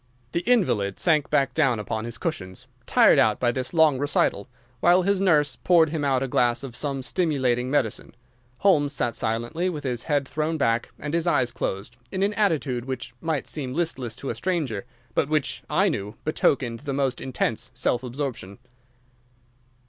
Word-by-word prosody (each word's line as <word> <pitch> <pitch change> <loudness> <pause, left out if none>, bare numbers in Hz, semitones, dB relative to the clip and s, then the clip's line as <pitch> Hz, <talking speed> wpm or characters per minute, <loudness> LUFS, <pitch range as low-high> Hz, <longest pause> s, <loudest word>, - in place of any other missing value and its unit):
The 170 - 0
invalid 110 - +2
sank 155 -4 +2
back 135 -1 +1
upon 115 -6 0
his 120 0 -6
cushions, 95 - -5 0.2
tired - - +5
out - - +3
by 120 -1 +2
this 130 0 -3
long 160 -5 +4
recital, 140 -8 0 0.3
while 175 +4 +4
his 200 0 +1
nurse 150 -7 +3
poured 170 -3 +4
him 160 -3 -2
out 135 -2 +1
a - - -2
glass 120 0 +1
of 130 -3 -7
some 135 -2 -2
stimulating 130 -8 0
medicine. 130 -6 -1 0.5
Holmes 150 -7 +3
sat 120 -4 -1
silently, 120 +11 -1
with 155 -5 -5
his 125 -3 -3
head 145 -3 0
thrown 155 +2 -2
back 115 -4 +1
and 150 +1 -5
his 170 +1 0
eyes 130 -8 +2
closed, 105 +4 -4
in 190 - -1
an 205 +1 +1
attitude 155 - 0
which 130 -2 -5
might 160 -4 -2
seem 135 -4 -4
listless 130 -9 -2
to 135 - -4
a - - -5
stranger, 150 - -2 0.3
but 145 - +1
which 150 -3 0
I - - +3
knew 105 +3 -3
betokened 130 -6 +1
the 140 -1 -4
most 135 -2 -1
intense 120 -3 -2
self 120 - +1
absorption. 125 -6 -5
135 Hz, 170 wpm, -25 LUFS, 120-160 Hz, 0.5 s, tired